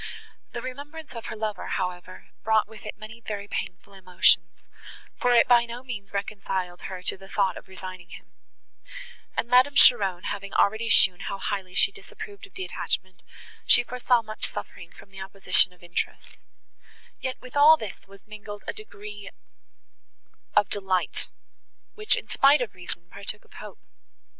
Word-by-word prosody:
The 240 - -4
remembrance 290 +5 -8
of 230 -1 -7
her - - -5
lover, 215 -1 -3
however, 180 0 -4
brought 220 -1 +3
with 220 0 -11
it - - -6
many 220 +1 -10
very 205 -2 -5
painful 185 0 -5
emotions, 180 -2 +3 0.7
for 245 - +3
it 240 - +6
by 240 -1 +6
no 240 +2 -7
means 210 -7 -7
reconciled 195 -3 -3
her 185 -1 -7
to - - +1
the 195 0 -13
thought 195 -3 +1
of - - -10
resigning 185 -1 -9
him; - - -12 1.1
and, - - +1
Madame 255 +4 +5
Cheron 195 -7 +6
having 200 -1 -4
already 220 +3 +3
shown 180 -1 +6
how 195 0 -4
highly 190 -2 -3
she 390 - +4
disapproved 410 -1 -10
of - - -30
the 375 - -4
attachment, 185 - -3 0.5
she - - +7
foresaw 245 -1 +2
much 215 0 -2
suffering 165 +11 -8
from 195 - -16
the 195 -1 -9
opposition 190 -1 +3
of 180 -1 -21
interests; 175 0 -4 0.8
yet 260 -1 -3
with 255 +1 -12
all 300 +2 +8
this 215 -6 -8
was 195 0 -16
mingled 210 -1 -9
a - - -2
degree 205 - -9 1.3
of 205 - +5
delight, 190 -3 -1 0.6
which, 425 0 +2
in - - -6
spite 280 +1 +5
of 235 -5 -3
reason, 175 -1 -7
partook 210 +1 -6
of - - -22
hope. - - -10
205 Hz, 160 wpm, -26 LUFS, 185-240 Hz, 1.3 s, all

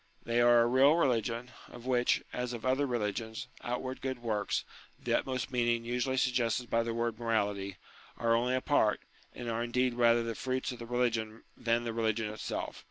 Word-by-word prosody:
They 120 +1 +1
are 120 0 +6
a - - +4
real 130 +5 +5
religion; 120 -5 0 0.2
of 120 0 -12
which, 125 -1 +2
as 125 0 -2
of 120 0 -6
other 135 +2 +2
religions, 110 -2 -2 0.2
outward 130 +2 -3
good 130 -1 -2
works 110 -4 -1 0.3
(the - - -2
utmost 130 0 -3
meaning 120 -2 +1
usually 125 +2 -1
suggested 125 -2 +1
by 115 - +3
the 115 0 -2
word 115 -1 -1
morality) 100 -4 -1 0.4
are 115 0 +2
only 125 +2 +2
a 130 - 0
part, 110 -8 +2 0.3
and 120 - -6
are 115 0 -1
indeed 125 +1 +1
rather 120 -1 +4
the 115 0 -3
fruits 130 +3 -2
of 125 - -8
the 115 - -7
religion 115 -2 -1
than 115 0 0
the 115 -1 -3
religion 110 -1 0
itself. 110 - -4
120 Hz, 185 wpm, -31 LUFS, 115-125 Hz, 0.4 s, are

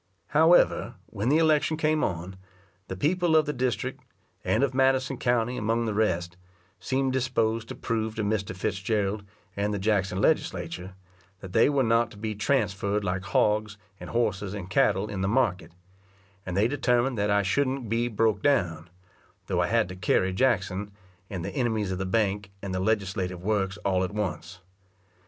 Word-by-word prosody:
However, 160 +3 +4
when 105 +5 -3
the 150 - +4
election 155 -1 +3
came 155 0 +1
on, 90 +2 -3 0.5
the 95 - -5
people 170 - +2
of 155 -1 +5
the 150 - -2
district, 125 -3 -2 0.4
and - - +1
of 135 -2 +1
Madison 135 0 +2
county 120 0 0
among 115 +2 0
the 110 - -1
rest, 90 -5 0 0.4
seemed 130 0 0
disposed 115 -3 0
to - - -7
prove 110 -1 -2
to 110 - -2
Mr. 100 -2 -1
Fitzgerald 100 +1 -1 0.3
and 100 +1 -1
the 105 - -1
Jackson 95 -2 0
Legislature, 90 - -1 0.5
that 95 -2 -9
they 115 - +5
were 140 -2 +2
not 115 0 +2
to 105 - -14
be 110 +1 -3
transferred 105 -3 0
like 90 -1 -1
hogs, 105 +1 +1 0.2
and - - -8
horses, 105 -4 -1
and 95 -2 -7
cattle 105 -6 +2
in 95 -3 -4
the 95 - 0
market; 100 -7 0 0.8
and 90 +1 -3
they 105 +3 +4
determined 125 -1 +1
that 105 +1 +1
I 100 0 +3
shouldn't 130 +4 0
be 115 +2 0
broke 110 -2 +1
down, 85 - +1 0.6
though - - 0
I - - +1
had - - +2
to 90 - -7
carry 95 0 +1
Jackson, 100 -3 0 0.4
and 95 -4 -5
the - - -4
enemies 110 -7 0
of 95 - -3
the 95 - -2
bank, 100 -1 0
and 95 -2 -4
the 95 - -1
legislative 95 -3 -1
works 100 -2 0
all 95 -1 +2
at 95 +3 -4
once. 90 -3 -4
105 Hz, 175 wpm, -27 LUFS, 95-125 Hz, 0.8 s, of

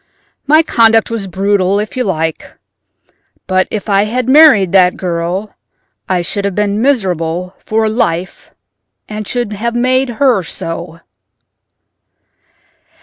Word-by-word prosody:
My 310 +3 +5
conduct 225 -5 +3
was 220 -4 -4
brutal 195 +1 0
if 210 0 -5
you 255 - 0
like, 160 -5 -3 0.9
but 185 0 +1
if 215 -1 -5
I 200 0 +2
had 245 +3 -2
married 265 - +6
that 180 -2 +4
girl 180 +3 -3 0.6
I 180 -2 0
should 200 +3 -3
have 200 -2 -2
been 210 0 0
miserable 180 - -1
for 220 0 0
life 185 -5 -2 0.6
and 215 -1 -6
should 240 -4 -2
have 235 +3 -3
made 255 +2 +1
her 255 -8 +3
so." 165 -1 -7
205 Hz, 125 wpm, -14 LUFS, 180-230 Hz, 0.9 s, married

